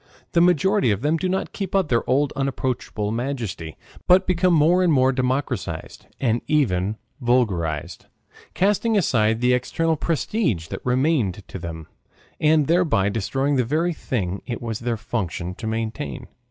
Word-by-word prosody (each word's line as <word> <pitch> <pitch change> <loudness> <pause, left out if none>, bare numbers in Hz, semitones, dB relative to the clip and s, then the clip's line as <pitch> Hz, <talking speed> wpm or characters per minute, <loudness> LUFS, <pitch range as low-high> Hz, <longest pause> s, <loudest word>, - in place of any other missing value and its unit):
The 170 - +3
majority 180 - +3
of 100 0 0
them 155 +3 +2
do 185 +3 -1
not 190 +1 -2
keep 195 -2 -4
up 190 -5 +2
their 120 -1 +3
old 140 +2 +2
unapproachable 130 -5 -2
majesty, 115 - -4 0.3
but 185 +1 +6
become 185 0 +2
more 165 +4 +4
and 180 -2 +3
more 130 -2 +4
democratized 125 - -3
and 120 -3 +1
even 110 - +1 0.2
vulgarized, 95 -12 0 0.5
casting 210 +3 +2
aside 110 - +2
the 125 0 +4
external 160 +6 0
prestige 150 - -1
that - - -6
remained 125 - 0
to 95 - -6
them, 80 -2 -7 0.5
and 155 -1 +4
thereby 160 - +2
destroying 135 +7 0
the 125 - +3
very 160 +8 0
thing 100 - -3
it 120 - -3
was 115 -2 -4
their 120 -1 -2
function 90 -5 -3
to 110 +4 -7
maintain. 115 +4 -4
125 Hz, 155 wpm, -23 LUFS, 110-160 Hz, 0.5 s, but